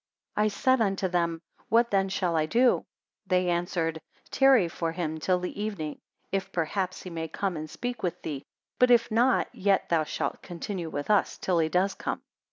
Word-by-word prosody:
I 210 0 +3
said 260 +5 +2
unto 195 -2 +1
them, 170 -2 -1 0.3
What 235 +1 +4
then 195 -1 +2
shall 180 -3 0
I 155 -1 +2
do? 245 +7 +3 0.4
They 180 -1 +2
answered, 170 -2 -1 0.3
Tarry 265 -8 +5
for 165 0 -3
him 160 -2 -3
till 180 +4 +2
the 180 +3 -5
evening, 185 -9 -4 0.3
if 195 0 -2
perhaps 185 +3 -2
he 185 - -7
may 165 -1 -3
come 185 +3 -2
and 155 0 -5
speak 245 +5 -5
with 180 - -2
thee; 140 -3 -4 0.4
but 250 - +6
if 235 -2 +4
not, 245 +4 +2
yet 195 0 +1
thou 165 -2 +3
shalt - - -3
continue 175 -1 -5
with 145 +6 -2
us 205 - +2
till 180 -3 +1
he 160 -1 +2
does 190 +3 +2
come. - - -4
185 Hz, 185 wpm, -28 LUFS, 165-210 Hz, 0.4 s, but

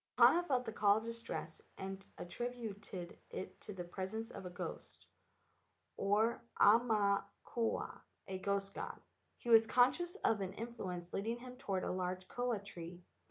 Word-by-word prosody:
Mahana 345 - +8
felt 255 -3 +2
the - - -2
call 205 -1 +5
of 220 - -2
distress, 230 -8 -5 0.2
and 195 0 -5
attrib¬ 240 +8 -3
uted 200 -5 -6
it 190 - -6
to - - -7
the 190 -3 -4
presence 190 +6 -4
of 190 - -6
a - - -5
ghost, 180 +1 -7 0.9
or 215 +4 +2 0.2
aumakua, 215 0 +3 0.3
a 190 -1 -3
ghost 195 0 0
god. - - -5 0.4
He 240 - -6
was 225 -1 +9
conscious 260 +10 +4
of 220 -3 +3
an 190 0 -2
influence 190 -6 -5
leading 225 +4 -1
him 250 +1 -9
toward 200 -8 -1
a - - 0
large 185 0 -2
koa 245 -2 0
tree. 175 -3 -8
205 Hz, 155 wpm, -37 LUFS, 190-230 Hz, 0.9 s, was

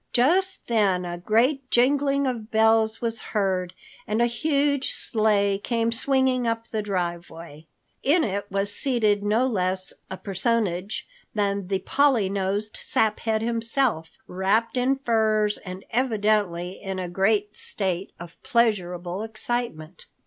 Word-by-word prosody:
Just 370 +10 +3
then 200 -6 +1
a 175 0 -5
great 255 +8 +1
jingling 280 +3 +2
of 235 -4 -3
bells 220 0 +3
was 230 -1 -2
heard 190 -3 -1 0.3
and 215 +2 -1
a 240 - +4
huge 280 +3 0
sleigh 205 -3 +1
came 230 +1 -1
swinging 260 0 +1
up 230 0 -2
the 220 - -3
driveway. 170 -5 -5 0.3
In 315 +5 +3
it 200 -1 -3
was 200 +1 -1
seated 220 -7 +1
no 215 +5 +2
less 185 -5 +3 0.2
a 190 - -6
personage 195 -1 -1 0.3
than 200 -2 -1
the 195 0 0
Polly 250 -1 +2
nosed 200 +2 -2
Saphead 220 0 0
himself, 230 - 0 0.2
wrapped 195 +6 0
in 255 +2 +2
furs 220 -5 +1
and 185 0 -9
evidently 210 -7 0
in 195 -1 -4
a 185 -1 -3
great 205 +3 0
state 190 -2 -2
of 175 -1 -11
pleasurable 190 -7 0
excitement. 220 -7 -4
215 Hz, 130 wpm, -24 LUFS, 190-235 Hz, 0.3 s, a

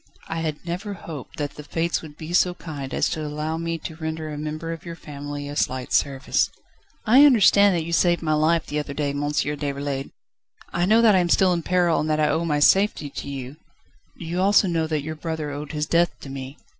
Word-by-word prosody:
"I 165 - -3
had 155 0 -4
never 190 +4 -4
hoped 155 -7 -9
that 145 -1 -2
the 150 - -7
Fates 165 +3 -1
would 150 -2 -12
be 160 +2 -7
so 180 0 +3
kind 145 -6 -7
as - - +1
to 155 - -3
allow 150 +2 -3
me 165 0 -2
to 160 0 -7
render 160 -1 -4
a 150 - -5
member 155 +2 -4
of 165 - -9
your 170 -1 -7
family 145 -2 -7
a 145 - -6
slight 130 -3 -1
service." 140 -1 +1 0.6
"I 250 +5 +7
understand 205 -7 +6
that 165 - 0
you 170 +1 -5
saved 175 0 +3
my 155 -1 +1
life 155 +2 +2
the 150 - -2
other 145 -1 -5
day, 145 -1 -1
Monsieur 145 +1 -1
Déroulède. 140 -1 -3 0.6
I 175 +1 +1
know 225 +3 +5
that 220 -2 +6
I 190 - +5
am 175 -1 +1
still 185 +1 +4
in 170 - -1
peril 175 -1 +2
and 155 - -1
that 155 0 +1
I 150 - +3
owe 165 +1 0
my 150 -3 +1
safety 190 -3 +3
to 140 - -6
you 135 +1 -6 0.3
..." - - -35
"Do 170 - -8
you 175 +3 -2
also 200 +1 +4
know 165 -2 0
that 155 -3 -1
your 155 +1 -4
brother 155 -1 -4
owed 145 +1 -6
his 150 -1 -2
death 170 +2 +1
to 135 - -8
me?" 135 +1 -7
155 Hz, 235 wpm, -24 LUFS, 145-170 Hz, 0.6 s, I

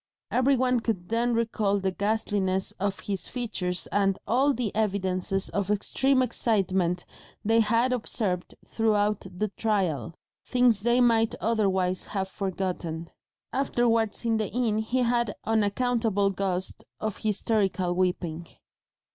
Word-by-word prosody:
Every 265 +2 +3
one 250 -1 +2
could 210 -6 -3
then 235 +1 +1
recall 220 -3 +1
the 190 0 0
ghastliness 200 -2 0
of 195 0 -2
his 195 -2 -2
features 190 -7 -2
and 195 -1 +2
all 265 +5 +3
the 240 -6 -2
evidences 195 -2 0
of 200 -1 -2
extreme 260 +6 +2
excitement 190 -7 +1 0.4
they 225 +2 +4
had 230 +3 +2
observed 205 -6 -1
throughout 210 -3 +1
the 205 +4 -2
trial, 185 - -1 0.3
things 245 -5 +3
they 240 +3 +3
might 225 -2 +3
otherwise 190 -5 +1
have 190 -2 -3
forgotten. 180 -4 -4 0.4
Afterwards 235 -5 +1
in 225 -1 +2
the 215 -2 -1
inn 225 -3 0
he 245 +4 0
had 235 -1 +1
an - - -6
unaccountable 220 -1 +1
gust 185 -1 -2 0.2
of 215 -2 -3
hysterical 200 -4 0
weeping. 175 -2 -1
210 Hz, 130 wpm, -27 LUFS, 190-230 Hz, 0.4 s, they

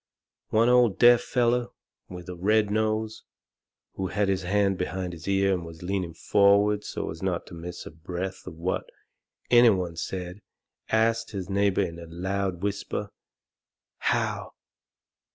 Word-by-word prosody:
One 115 +2 +3
old 125 -4 +4
deaf 120 0 +7
feller, 120 -1 +1 0.4
with 90 -1 -9
a 90 - -5
red 105 +3 +2
nose, 110 0 -1 0.7
who 95 - -3
had 100 0 0
his 95 -1 +1
hand 100 +1 +1
behind 90 -1 -3
his 85 +1 -10
ear 100 0 +2
and 90 -2 -2
was 80 0 -10
leaning 90 -3 -2
forward 100 +3 +3
so - - -4
as - - -9
not - - -1
to - - -13
miss 85 +1 -7
a - - -8
breath 90 +4 -6
of - - -7
what 90 +3 -2 0.6
any 120 -1 +8
one 90 -5 0
said, 90 +3 -5 0.5
ast 115 +1 +2
his 95 -1 -5
neighbour 100 0 +2
in 85 -2 -5
a 85 - -9
loud 95 +2 -3
whisper, 100 -1 -3 0.9
"How?" - - -1
95 Hz, 155 wpm, -26 LUFS, 90-110 Hz, 0.9 s, any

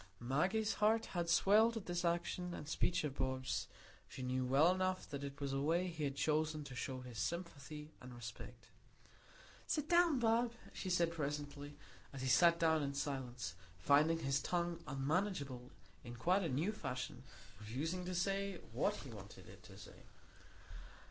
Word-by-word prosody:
Maggie's 180 - +1
heart 220 +2 +4
had 170 -2 -1
swelled 220 +7 +5
at 215 - -5
this 175 0 -2
action 175 +1 -1
and 150 - -7
speech 175 +3 +1
of 150 -3 -2
Bob's; 130 0 -1 0.4
she 130 - -7
knew 130 0 0
well 140 +8 +5
enough 185 0 -1
that 140 -1 -5
it 140 0 -6
was 140 -1 -2
a 135 - 0
way 165 +5 +2
he 160 -3 -3
had 140 -1 -2
chosen 155 +1 +1
to 140 -2 -9
show 130 +1 -4
his 125 -3 -7
sympathy 155 -3 -4
and 125 - -9
respect. 120 0 -9 1.0
"Sit 300 -1 0
down, 345 -4 +5
Bob," 235 0 +2 0.2
she 190 - -4
said 175 -2 +3
presently, 145 -2 -4 0.3
and 135 - -7
he - - 0
sat 170 +7 +6
down 160 -1 +4
in 140 -1 -2
silence, 125 - -3 0.2
finding 150 - +4
his 135 -3 0
tongue 170 -1 -1
unmanageable 140 -3 -1 0.3
in 120 0 -7
quite 180 +12 +2
a 170 - -1
new 150 +10 +1
fashion, 130 - -4 0.4
refusing 145 +12 -3
to 180 0 -3
say 195 +1 0
what - - +1
he - - -8
wanted - - -11
it - - -13
to - - -13
say. - - -13
155 Hz, 170 wpm, -38 LUFS, 135-180 Hz, 1.0 s, sat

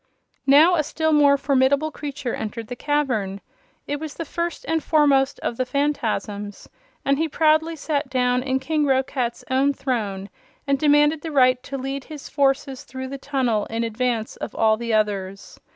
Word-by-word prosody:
Now 300 +6 +7
a 305 - +2
still 315 +1 0
more 285 -1 +5
formidable 280 +2 +2
creature 285 -4 -5
entered 220 +1 -5
the 245 - -4
cavern. 245 -9 -1 0.5
It 290 0 -3
was 310 -1 -7
the 330 - -5
First 340 +2 -4
and 320 -1 0
Foremost 285 -3 +3
of 235 - -3
the 255 - +1
Phanfasms 225 -7 -2 0.4
and 275 +1 +2
he 320 0 0
proudly 315 +2 +2
sat 290 -2 -2
down 250 -1 +1
in 260 0 -1
King 300 +2 0
Roquat's 260 -2 -1
own 275 +2 +3
throne 205 -8 -3 0.3
and 275 -1 +1
demanded 295 +1 +4
the 325 - -5
right 255 -3 +4
to 275 +1 -6
lead 270 0 -4
his 300 -3 -9
forces 270 -1 0
through 260 0 -7
the 275 0 -6
tunnel 255 -7 0
in 230 +1 -2
advance 230 0 -2
of - - -6
all 220 -1 +3
the 230 +1 -4
others. 200 -3 -2
270 Hz, 170 wpm, -23 LUFS, 240-295 Hz, 0.5 s, Now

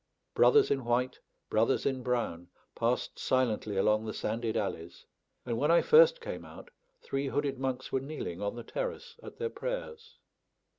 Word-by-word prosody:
Brothers 435 -2 +5
in 135 -2 +1
white, 120 +2 0 0.3
brothers 115 +4 +2
in 130 -2 0
brown, 120 -9 -2 0.3
passed - - -1
silently 110 -5 0
along 105 +2 +3
the 110 - -5
sanded 115 -1 -2
alleys; 85 -4 -4 0.4
and 115 -2 -2
when 150 - +2
I 170 0 +5
first - - +6
came 470 - -6
out, - - -12 0.3
three 135 +1 -2
hooded 140 -1 -1
monks 130 -1 -3
were 135 - +1
kneeling 135 - -6
on 100 +2 -2
the 120 - -7
terrace 485 - -5
at - - -11
their 460 -1 -2
prayers. 475 -2 -6
130 Hz, 160 wpm, -30 LUFS, -, 0.4 s, first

